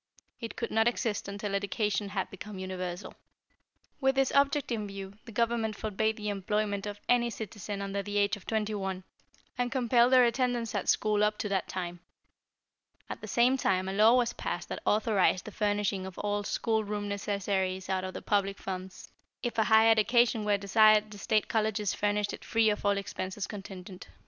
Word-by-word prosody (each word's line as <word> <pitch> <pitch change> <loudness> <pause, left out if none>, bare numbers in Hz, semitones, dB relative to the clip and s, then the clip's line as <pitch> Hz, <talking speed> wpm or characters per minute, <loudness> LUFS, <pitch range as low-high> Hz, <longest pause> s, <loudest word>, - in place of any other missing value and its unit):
It 230 -2 -6
could 235 - -4
not 225 +1 +3
exist 230 -4 -1
until 200 0 -4
education 205 0 -1
had 195 -1 -3
become 195 +1 -8
universal. 185 -1 -5 0.9
"With 265 -1 +2
this 270 -1 +2
object 280 -1 +2
in 215 -3 -2
view, 195 -1 -7
the 230 - -10
Government 230 -1 0
forbade 220 +1 -1
the 210 -1 -3
employment 205 0 -1
of 205 0 -6
any 240 -1 +3
citizen 210 -2 -6
under 200 0 -2
the 205 +1 -4
age 205 +1 +2
of 205 - -15
twenty 220 -1 -1
one, 190 -2 -3 0.6
and 245 0 0
compelled 245 -1 +3
their 255 -1 +7
attendance 240 -1 0
at - - -1
school 210 -1 +2
up 210 0 +1
to 210 - -3
that 195 -2 0
time. 175 -1 -5 1.1
At - - -6
the - - -7
same 250 +3 +3
time 185 -6 +1
a 190 - -2
law 215 +4 +6
was 245 -2 +2
passed - - -4
that - - -5
authorized 210 -4 +2
the 215 - -7
furnishing 205 -2 -1
of 190 - -10
all 205 0 -1
school 220 +1 0
room 205 0 -3
necessaries 195 -2 -2
out 190 -1 -1
of 185 0 -5
the - - -6
public 200 -1 +1
funds. 185 0 -7 0.3
If 240 -2 -2
a 220 - +4
higher 220 0 +6
education 225 0 +3
were 205 -1 +3
desired 215 +1 +4
the 205 - -10
State 215 +1 +1
Colleges 215 -2 0
furnished 205 0 0
it - - -8
free 225 -1 +3
of 210 - -4
all 200 0 +2
expenses 195 0 -4
contingent. 190 -2 -9
210 Hz, 190 wpm, -30 LUFS, 195-225 Hz, 1.1 s, their